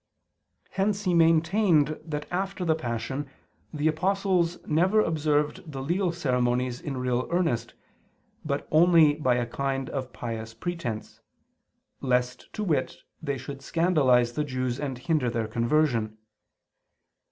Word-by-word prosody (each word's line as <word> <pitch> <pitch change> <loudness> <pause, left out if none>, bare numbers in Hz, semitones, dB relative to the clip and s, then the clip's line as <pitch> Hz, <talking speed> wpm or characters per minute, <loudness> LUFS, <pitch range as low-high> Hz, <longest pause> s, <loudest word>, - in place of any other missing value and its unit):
Hence 200 +1 0
he 180 -3 +1
maintained 165 -1 +3
that 150 -2 -4
after 190 0 -2
the 160 - +3
Passion 130 0 -4 0.4
the 150 0 0
apostles 180 +1 +1
never 180 +7 +3
observed 150 -3 0
the 135 - -6
legal 175 +5 0
ceremonies 125 -5 0
in 140 -3 -4
real 125 0 -1
earnest; 145 -10 0 0.7
but 140 -2 -2
only 160 -2 +6
by 130 -5 +1
a 120 -1 0
kind 135 +2 -3
of 130 -2 -4
pious 115 -2 -6
pretense, 135 -7 -5 0.8
lest, 125 -1 -1
to 215 - -3
wit, 170 -1 0 0.2
they 140 -4 -2
should 135 +2 -8
scandalize 135 -7 +3
the 150 - -1
Jews 130 -2 -2
and 135 -4 -3
hinder 135 -1 0
their 115 -2 -2
conversion. 115 -2 +1
145 Hz, 130 wpm, -27 LUFS, 125-170 Hz, 0.8 s, only